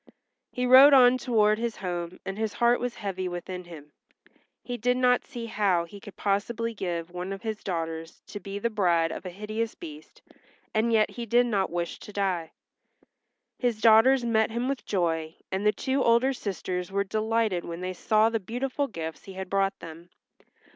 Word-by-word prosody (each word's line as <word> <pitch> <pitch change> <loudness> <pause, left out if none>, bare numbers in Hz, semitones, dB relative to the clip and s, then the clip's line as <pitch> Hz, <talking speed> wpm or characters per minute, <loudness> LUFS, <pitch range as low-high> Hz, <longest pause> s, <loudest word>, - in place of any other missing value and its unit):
He 250 - -2
rode 265 +3 +9
on 255 -1 +7
toward 215 -4 +2
his 235 -1 -2
home 175 -2 -5
and 195 - -4
his 215 -1 -2
heart 240 0 +3
was 245 -1 -3
heavy 190 -3 -4
within 180 +1 -6
him. 150 -4 -12 0.7
He 245 - -4
did 245 +2 +1
not 250 -1 +3
see 235 -1 -6
how 195 -6 +1
he 200 +4 -12
could 200 0 -12
possibly 230 +3 -1
give 175 -4 -4
one 180 +2 -5
of 195 +3 -6
his 220 -2 -4
daughters 165 -2 -4
to 205 - -8
be 195 +1 -6
the 230 +3 -1
bride 170 -6 +2
of 185 - -6
a - - -4
hideous 215 +4 -4
beast 310 -3 -11 0.5
and 220 +2 +1
yet 215 -2 +3
he 235 -1 -6
did 240 +3 +4
not 200 -5 0
wish 170 0 -3
to - - -11
die. 185 -5 -1 1.1
His 240 -4 0
daughters 235 +4 +6
met 220 -2 +2
him 235 +3 -2
with 275 -1 -3
joy, 165 -4 -1 0.2
and 195 +2 0
the - - +6
two 265 +6 -1
older 235 +3 +4
sisters 185 -5 -4
were 200 +1 +1
delighted 215 -2 0
when 170 +1 -6
they 185 0 -3
saw 215 +4 +3
the 225 -1 -1
beautiful 255 +7 -2
gifts 165 -7 -7
he 195 - -9
had 190 -1 -7
brought 195 0 +1
them. 165 +1 -10
210 Hz, 190 wpm, -27 LUFS, 180-235 Hz, 1.1 s, rode